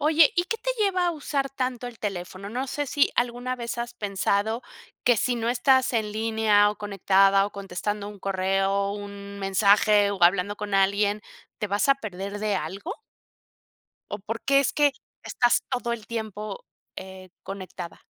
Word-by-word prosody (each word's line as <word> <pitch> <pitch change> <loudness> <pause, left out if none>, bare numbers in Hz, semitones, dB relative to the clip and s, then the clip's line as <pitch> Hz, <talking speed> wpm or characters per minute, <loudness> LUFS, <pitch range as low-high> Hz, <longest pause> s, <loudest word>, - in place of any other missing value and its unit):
Oye, 305 +1 +5
¿y 350 - +3
qué 455 +4 -2
te - - -2
lleva 385 -5 +2
a - - +2
usar 285 -3 -2
tanto 255 -2 -3
el 240 -2 -10
teléfono? 190 -1 -5
No 255 +4 -2
sé, 290 +2 -2
si 285 +2 +2
alguna 245 +1 -1
vez 235 -1 -5
has 240 0 -4
pensado 205 +2 0 0.4
que 245 -2 +5
si 245 +3 +1
no 230 0 -1
estás 260 +1 +3
en 215 -2 0
línea, 220 -1 +3
o 210 - -7
conectada 195 -1 +3
o - - -9
contestando 200 +1 -4
un 205 -1 -10
correo, 195 +1 0
un 200 0 -7
mensaje 200 +1 +4
o 200 - -4
hablando 200 +3 +2
con 205 -1 -4
alguien, 200 +2 +2 0.4
¿te 210 - -2
vas 205 +6 +1
a 275 - +7
perder 200 -4 -6
de 210 -2 0
algo? 205 - -5 1.2
O, 205 - -3
¿por 225 +3 -5
que 275 0 +5
es 280 - 0
que 290 -2 +3 0.3
estás 240 -1 +2
todo 245 -2 -1
el 225 -2 -6
tiempo, 220 - -5 0.3
eh, 190 -1 -9
conectada? 185 -3 -8
210 Hz, 170 wpm, -25 LUFS, 200-245 Hz, 1.2 s, a